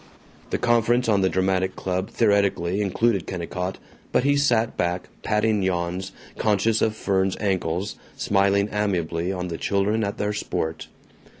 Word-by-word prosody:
The - - 0
conference 120 +1 +2
on 100 -3 +3
a 95 - +3
dramatic 95 0 0
club 95 +1 -2
theoretically 100 -4 +2
included 100 0 +1
Kennicott, 90 +1 -4 0.3
but - - +2
he 140 +1 +3
sat 120 -6 +2
back, 90 +1 -1
patting 105 -1 +1
yawns, 90 +1 -1 0.3
conscious 110 +1 +2
of 110 -1 +1
Fern's 95 -2 0
ankles, 95 -1 -1 0.2
smiling 100 0 +2
amiably 90 -4 -1
on 90 -1 -3
the 85 - -5
children 105 +3 +1
at 100 0 -3
their 105 0 -1
sport. 80 -5 -3
100 Hz, 140 wpm, -24 LUFS, 90-105 Hz, 0.3 s, on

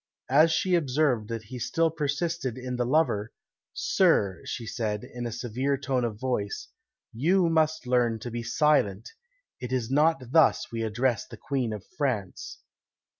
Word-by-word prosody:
As 155 +4 +6
she 180 +3 +1
observed 135 -8 +1
that 115 -1 -4
he 125 +4 -8
still 165 +7 +1
persisted 150 -3 -2
in 125 0 -4
the 120 -1 -1
lover, 125 -7 +1 0.4
"Sir," 95 -2 +2
she 120 -3 -5
said, 105 -2 -3
in 120 -1 -6
a - - -5
severe 125 +4 -1
tone 130 -2 -1
of 110 -3 -3
voice, 120 -6 -2 0.4
"you 170 +9 +2
must 155 -2 +1
learn 120 -2 +2
to 120 - -6
be 120 +1 -3
silent; 115 -5 +1 0.5
it 125 0 -6
is 125 -2 -1
not 150 -3 +2
thus 160 +1 +4
we 115 -1 -3
address 115 +2 0
the - - -11
Queen 130 -5 -2
of 105 -2 -6
France." 110 -10 -2
125 Hz, 160 wpm, -27 LUFS, 115-150 Hz, 0.5 s, As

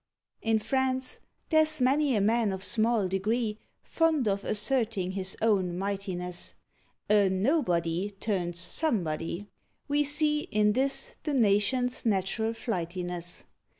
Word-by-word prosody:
In 225 -1 +2
France 260 +3 -1 0.3
there's 310 -1 +3
many 270 +1 +3
a 205 - +2
man 220 +1 +2
of 190 0 -3
small 225 -2 +2
degree 210 +3 -1 0.2
Fond 320 -7 +1
of 200 0 0
asserting 215 -4 0
his 190 0 -3
own 190 -6 +2
mightiness: 185 -2 -3 0.5
A 205 -2 +4
"nobody" 185 - +1
turns 190 -4 -3
"somebody." 180 - -1 0.4
We 290 0 +2
see 300 +1 +2
In 210 0 +2
this 270 +3 0
the 300 -2 -2
nation's 245 +3 +2
natural 220 +1 0
flightiness. 175 -5 -4
210 Hz, 115 wpm, -28 LUFS, 190-255 Hz, 0.5 s, A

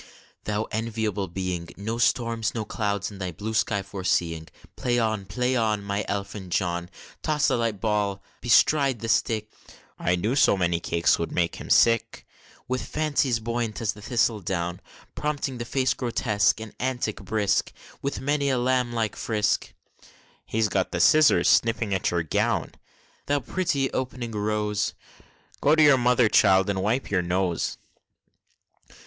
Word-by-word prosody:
Thou 105 +1 -1
enviable 110 -3 -2
being! 90 -1 -4
No 110 +4 -4
storms, 115 -1 +1
no 110 -2 -2
clouds, 100 -1 -2
in 100 - -11
thy 90 -2 -3
blue 105 +7 -5
sky 110 -3 +1
foreseeing, 90 -4 -1 0.3
Play 120 -1 0
on, 110 -4 -1
play 125 +8 0
on, 110 -4 +1
My 100 +1 -2
elfin 100 -1 -4
John! 85 -1 -1 0.3
Toss 150 -2 +1
the - - +2
light 115 -4 -1
ball 105 -2 -1 0.2
bestride 135 +1 +3
the 115 - -4
stick 110 -1 0 0.5
(I 90 - +1
knew 105 +9 -1
so 135 -7 +4
many 85 -2 +1
cakes 85 0 +1
would 85 - -3
make 85 -1 0
him - - -9
sick!) 115 -1 +3 0.4
With 130 0 -2
fancies, 145 -6 0
buoyant 115 -1 -3
as 110 -2 -1
the 105 - -13
thistle 115 0 +1
down, 90 -1 -3 0.3
Prompting 145 -4 -3
the 120 - -4
face 130 +1 +1
grotesque, 110 -4 +1
and 110 -1 -8
antic 125 -4 -2
brisk, 105 -2 0 0.3
With 140 -1 -3
many 140 +1 +1
a 130 - +1
lamb 125 -1 +1
like 110 -3 -1
frisk, 105 -2 0 0.8
(He's 110 0 +1
got 95 -2 0
the 90 - -2
scissors, 155 - +5
snipping 115 -3 +2
at 95 - 0
your 85 -1 0
gown!) 80 - 0 0.6
Thou 145 0 +2
pretty 140 0 -1
opening 125 -2 -3
rose! 105 -1 -1 0.7
(Go 150 +2 +4
to 155 - +5
your 145 -3 +6
mother, 125 -1 +4
child, 95 -1 +4
and 95 -1 -2
wipe 110 +6 -1
your 95 -2 +2
nose!) 90 -1 -1
110 Hz, 155 wpm, -25 LUFS, 100-120 Hz, 0.8 s, your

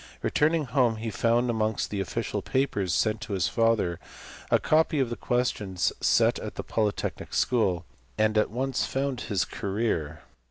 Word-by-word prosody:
Returning 155 +1 +2
home 125 -2 +2
he 110 0 -4
found 115 +3 +2
amongst 110 -2 -1
the 100 - -2
official 95 - -3
papers 125 -9 0
sent 110 +5 +1
to 110 - -5
his 95 -3 +1
father 115 -7 +1 0.5
a - - +5
copy 155 -1 +2
of 130 -3 0
the - - -2
questions 105 -8 -1
set - - +3
at - - -6
the - - -4
Polytechnic 105 -2 -2
school, 95 -9 +1 0.3
and 110 0 +2
at 110 - +3
once 130 +3 -1
found 135 -2 -2
his 100 -5 0
career. 95 -7 -2
115 Hz, 160 wpm, -27 LUFS, 100-125 Hz, 0.5 s, a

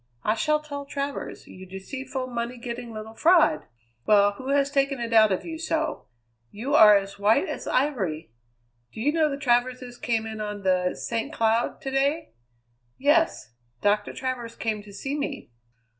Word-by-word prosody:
I 215 - +2
shall 300 +8 +1
tell 285 -2 -7
Travers, 280 0 -5
you 185 - -12
deceitful, 260 +8 -5
money 240 0 -4
getting 240 0 -6
little 220 0 -8
fraud! 320 - +4 0.4
Well, 205 -1 +5
who 260 +6 -10
has 280 0 +2
taken 275 -1 +1
it 230 -1 -3
out 215 -2 +6
of 190 - -1
you 320 -1 -6
so? 320 -1 -2 0.4
You 240 - -4
are 210 -7 +8
as 195 0 -5
white 215 - +3
as - - -5
ivory. 190 - -1 0.6
Do - - -10
you 280 +6 +2
know 315 -2 +3
the 275 - -3
Traverses 250 -1 0
came 230 -2 -1
in 220 -1 -6
on 210 -1 -5
the 185 -1 +1
St. 230 +5 -3
Cloud 225 -2 0
to 270 - -4
day?" 275 - 0 0.6
"Yes. 295 - +2 0.3
Doctor 205 0 +2
Travers 245 -3 -4
came 220 -2 -2
to 205 0 -14
see 270 +8 -4
me." 285 - -4
240 Hz, 170 wpm, -25 LUFS, 210-280 Hz, 0.6 s, are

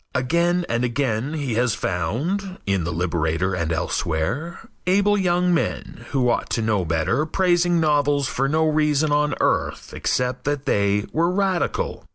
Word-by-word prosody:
Again 170 +7 +1
and 120 +1 -1
again 125 +1 -1
he 140 -6 -2
has 120 0 +1
found, 160 - -2
in 95 -4 0
The 85 - -2
Liberator 85 +1 -1
and 85 -3 -2
elsewhere, 80 - -2 0.2
able 200 +2 +3
young 180 -2 +2
men, 165 - -3
who 130 -4 +1
ought 120 - 0
to - - 0
know 105 -4 +1
better, 80 - 0
praising 175 -1 +2
novels 145 -3 +2
for 135 -1 -1
no 160 +2 +2
reason 150 -1 +2
on 150 -1 +2
earth - - -1
except 125 0 -1
that 145 -1 -1
they 100 -4 +1
were 170 +2 +2
radical. 190 -1 -1
145 Hz, 155 wpm, -22 LUFS, 105-170 Hz, 0.2 s, able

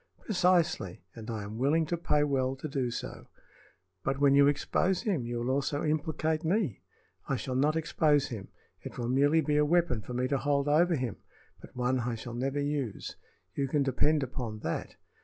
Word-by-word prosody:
"Precisely; 175 - +1
and 115 -1 -9
I 110 -2 -3
am 105 +2 -7
willing 155 +5 +3
to 170 - -1
pay 150 -3 +1
well 135 -2 0
to 135 - -6
do 135 -4 -1
so." 120 - -6 0.8
"But 135 0 -1
when 140 -1 +5
you 140 0 +6
expose 180 +6 +1
him 175 - -1
you 120 0 -3
will 120 +2 -1
also 140 +2 0
implicate 155 +1 0
me." 170 - 0 0.5
"I - - +2
shall 130 - -4
not 145 +4 +2
expose 150 -3 +2
him. 105 -5 -6 0.3
It - - -9
will 120 -1 -2
merely 145 +5 +4
be 150 0 +1
a 150 - +5
weapon 155 -7 +2
for 125 - -7
me 125 +1 +1
to 140 - +1
hold 140 0 +1
over 170 +4 +4
him, 125 - -3 0.4
but - - -14
one 125 +1 +1
I 120 0 -2
shall 115 +1 -7
never 135 +4 -1
use. 145 -6 -3 0.4
You 140 - -1
can 140 +1 +1
depend 145 +3 +2
upon 120 -4 -5
that. 80 - -4
140 Hz, 195 wpm, -30 LUFS, 125-155 Hz, 0.8 s, you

